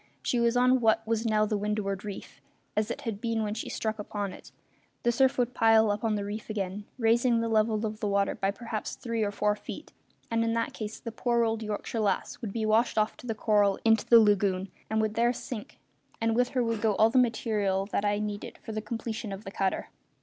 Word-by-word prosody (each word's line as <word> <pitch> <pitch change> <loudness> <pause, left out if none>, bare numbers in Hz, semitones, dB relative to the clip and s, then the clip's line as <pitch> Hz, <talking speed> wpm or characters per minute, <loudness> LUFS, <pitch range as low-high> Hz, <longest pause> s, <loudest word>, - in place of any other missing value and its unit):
She 245 - +1
was 235 +1 +2
on 255 +1 +4
what 220 -1 +3
was 225 +1 0
now 215 -1 +3
the 210 -1 -1
windward 205 -2 -2
reef 205 -2 -8 0.3
as 215 +1 +1
it 280 - -4
had 225 -6 -4
been 230 -2 0
when 210 -1 -2
she 220 - -5
struck 220 -1 -3
upon 205 -2 -4
it; - - -13 0.5
the 240 - +3
surf 265 +2 +3
would 245 0 +1
pile 225 -2 +5
up 205 +2 -3
on 220 -2 +1
the 200 -1 -2
reef 210 +2 -6
again, 200 -1 -3
raising 235 0 +3
the 230 - 0
level 220 0 +2
of 215 0 -4
the 210 - -1
water 200 0 +1
by 195 - -1
perhaps 220 +1 -4
three 230 -2 -3
or 210 - +1
four 210 0 +1
feet, 205 - -9 0.4
and 230 0 +2
in 230 0 0
that 230 0 -1
case 215 0 -6
the 230 - -6
poor 235 +1 +1
old 225 -1 0
Yorkshire 215 +1 -3
Lass 210 +3 -1
would 220 -5 -4
be 220 +1 -2
washed 220 +3 +2
off 215 0 +2
the 230 -3 -4
coral 205 -2 +3
into 225 -1 +4
the 235 - +8
lagoon, 200 -3 +2 0.2
and 220 0 +1
would 215 -1 0
there 235 +2 +3
sink. 235 -3 -7 0.4
And 225 0 +1
with 245 +1 +2
her 250 - +3
would 230 -2 -1
go 215 -3 +2
all 220 +2 +4
the 255 - +4
material 210 -5 +1
that - - 0
I 205 0 +1
needed 210 -1 -4
for - - -9
the 215 0 -3
completion 220 0 -4
of 195 +2 -6
the 195 - -7
cutter. 195 -1 -1
220 Hz, 230 wpm, -28 LUFS, 210-230 Hz, 0.5 s, the